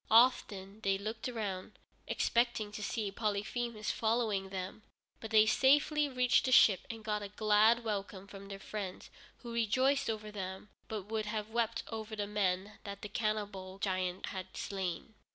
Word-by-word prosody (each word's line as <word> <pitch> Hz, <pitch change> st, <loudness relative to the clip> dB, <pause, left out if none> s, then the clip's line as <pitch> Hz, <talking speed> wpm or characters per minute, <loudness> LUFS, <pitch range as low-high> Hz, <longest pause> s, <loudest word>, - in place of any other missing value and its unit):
Often 215 Hz, -4 st, +4 dB
they 195 Hz, -2 st, +2 dB
looked 220 Hz, +4 st, -4 dB
round, 210 Hz, -5 st, -4 dB, 0.3 s
expecting 235 Hz, -3 st, +1 dB
to 210 Hz, -, -6 dB
see 210 Hz, -1 st, -2 dB
Polyphemus 215 Hz, +2 st, -2 dB
following 220 Hz, -4 st, 0 dB
them, 190 Hz, +2 st, -5 dB, 0.4 s
but 225 Hz, -, -7 dB
they 215 Hz, 0 st, +6 dB
safely 290 Hz, +5 st, +4 dB
reached 250 Hz, -1 st, +3 dB
the 260 Hz, -, +1 dB
ship 200 Hz, -6 st, +6 dB
and 225 Hz, -1 st, -6 dB
got 210 Hz, -1 st, -1 dB
a 205 Hz, -, -4 dB
glad 215 Hz, +3 st, +4 dB
welcome 200 Hz, -3 st, -3 dB
from 200 Hz, 0 st, -10 dB
their 195 Hz, 0 st, -6 dB
friends, 195 Hz, -1 st, -6 dB, 0.3 s
who 235 Hz, -1 st, -6 dB
rejoiced 255 Hz, +5 st, +2 dB
over 215 Hz, -1 st, -3 dB
them, 190 Hz, 0 st, -6 dB, 0.2 s
but 215 Hz, -3 st, -4 dB
would 215 Hz, +1 st, -3 dB
have 215 Hz, 0 st, -3 dB
wept 230 Hz, 0 st, 0 dB
over 220 Hz, -1 st, -5 dB
the 205 Hz, -1 st, -1 dB
men 200 Hz, -1 st, -1 dB
that 200 Hz, -1 st, -7 dB
the 210 Hz, -, -5 dB
cannibal 205 Hz, -3 st, -2 dB
giant 185 Hz, -2 st, -1 dB
had 185 Hz, -1 st, -6 dB
slain. 190 Hz, +2 st, -3 dB
210 Hz, 160 wpm, -33 LUFS, 195-225 Hz, 0.4 s, they